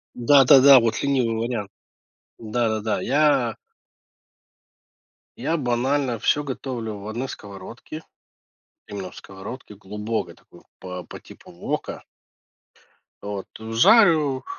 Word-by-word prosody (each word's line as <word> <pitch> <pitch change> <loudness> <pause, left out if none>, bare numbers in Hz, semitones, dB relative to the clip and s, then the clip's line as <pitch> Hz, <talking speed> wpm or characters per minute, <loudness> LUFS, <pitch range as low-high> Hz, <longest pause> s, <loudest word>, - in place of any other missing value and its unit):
Да-да-да, 135 +1 +7
вот 115 -1 -1
ленивый 130 -5 +1
вариант, 115 -3 -3 0.7
да-да-да, 110 -1 -1
я 135 -4 +2 1.8
Я 160 +7 -1
банально 130 -1 0
всё 145 - +1
готовлю 125 -5 -5
в 100 +1 -9
одной 120 +5 -4
сковородке, 105 +9 -9 0.9
именно 100 -3 -6
в - - -17
сковородке, 105 +4 -10
глубокой 105 +3 -5
такой, - - -20 0.2
по 90 -1 -7
по - - -11
типу - - -16
вока. - - -5 1.2
Вот. 100 -1 -6
Жарю, 150 - +4
120 Hz, 100 wpm, -23 LUFS, 105-135 Hz, 1.8 s, Да-да-да